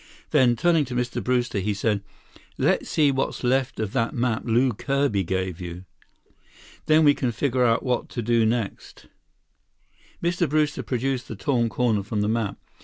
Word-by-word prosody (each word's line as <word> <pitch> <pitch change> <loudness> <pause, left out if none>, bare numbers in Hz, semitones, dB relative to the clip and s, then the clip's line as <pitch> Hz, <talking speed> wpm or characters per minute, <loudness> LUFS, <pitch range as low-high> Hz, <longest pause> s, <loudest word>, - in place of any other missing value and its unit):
Then, 130 -5 +4
turning 165 +4 +3
to 125 -1 -6
Mr. 125 -1 -2
Brewster, 125 -4 0
he 100 +2 -1
said, 105 0 0 0.6
"Let's - - +1
see 150 -3 +3
what's 135 0 -2
left 130 0 0
of 110 -2 -3
that 115 -3 0
map 120 -2 0
Lew 120 +2 +2
Kirby 140 -3 0
gave 95 0 -3
you. 90 +1 -7 1.0
Then 155 +1 +5
we 145 -1 +6
can 125 -3 -1
figure 125 -1 +1
what 125 0 -2
to 120 - -4
do 115 +1 +2
next." 110 -2 -3 1.2
Mr. 175 -2 +1
Brewster 150 0 +1
produced 130 0 -2
the 115 - -6
torn 115 +3 0
corner 115 -3 +1
from 105 +1 -3
the 105 - 0
map. 110 -2 -1
120 Hz, 165 wpm, -24 LUFS, 110-135 Hz, 1.2 s, we